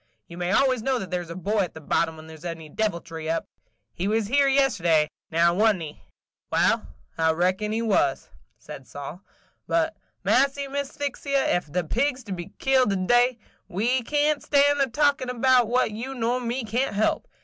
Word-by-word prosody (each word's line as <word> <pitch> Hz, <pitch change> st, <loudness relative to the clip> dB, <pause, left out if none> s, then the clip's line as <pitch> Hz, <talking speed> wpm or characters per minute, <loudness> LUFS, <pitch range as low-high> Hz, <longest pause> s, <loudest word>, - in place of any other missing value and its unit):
You 170 Hz, -, -10 dB
may 175 Hz, +1 st, -2 dB
always 255 Hz, +2 st, +3 dB
know 265 Hz, +2 st, 0 dB
that 195 Hz, -6 st, -6 dB
there 180 Hz, -1 st, -1 dB
's 170 Hz, -, -14 dB
a 170 Hz, -, -6 dB
boy 205 Hz, +4 st, -1 dB
at 185 Hz, -5 st, -1 dB
the -, -, -7 dB
bottom, 160 Hz, +1 st, 0 dB
when 155 Hz, -, -11 dB
there 160 Hz, 0 st, -11 dB
's 160 Hz, -, -16 dB
any 165 Hz, -3 st, -6 dB
deviltry 165 Hz, -5 st, -3 dB
up. 165 Hz, 0 st, -1 dB, 0.5 s
He 185 Hz, -, -3 dB
was 220 Hz, +1 st, +1 dB
here 280 Hz, +6 st, +3 dB
yesterday, 185 Hz, -, +3 dB
– -, -, -70 dB
now 170 Hz, +1 st, +4 dB
wa' 215 Hz, +4 st, +4 dB
n't 185 Hz, -, -7 dB
he?" 150 Hz, -1 st, -9 dB, 0.5 s
"Wal, -, -, +2 dB, 0.3 s
I 160 Hz, 0 st, +4 dB
reckon 185 Hz, +5 st, 0 dB
he 225 Hz, +1 st, -1 dB
was," 185 Hz, -11 st, +1 dB, 0.3 s
said 135 Hz, -, -11 dB
Sol. 145 Hz, +5 st, -8 dB, 0.5 s
"But, 320 Hz, -1 st, +1 dB, 0.3 s
massy, 275 Hz, +1 st, +2 dB
Miss 280 Hz, 0 st, -3 dB
Sphyxy, 280 Hz, -1 st, -3 dB
ef 175 Hz, -, +1 dB
the 180 Hz, +2 st, 0 dB
pigs 255 Hz, -, 0 dB
is -, -, -17 dB
to 205 Hz, -, -9 dB
be 175 Hz, +1 st, -5 dB
killed 265 Hz, -3 st, +3 dB
to 200 Hz, -, +1 dB
day, 240 Hz, +6 st, +3 dB, 0.3 s
we 240 Hz, +8 st, 0 dB
can't 295 Hz, +3 st, +1 dB
stan' 285 Hz, 0 st, +3 dB
a 275 Hz, -, +3 dB
talkin' 275 Hz, 0 st, +1 dB
about 250 Hz, -1 st, +3 dB
what 245 Hz, -1 st, +1 dB
you 245 Hz, +6 st, -5 dB
nor 245 Hz, +1 st, 0 dB
me 245 Hz, +2 st, -2 dB
can't 230 Hz, +2 st, -1 dB
help. 215 Hz, +2 st, 0 dB
220 Hz, 205 wpm, -25 LUFS, 175-265 Hz, 0.5 s, now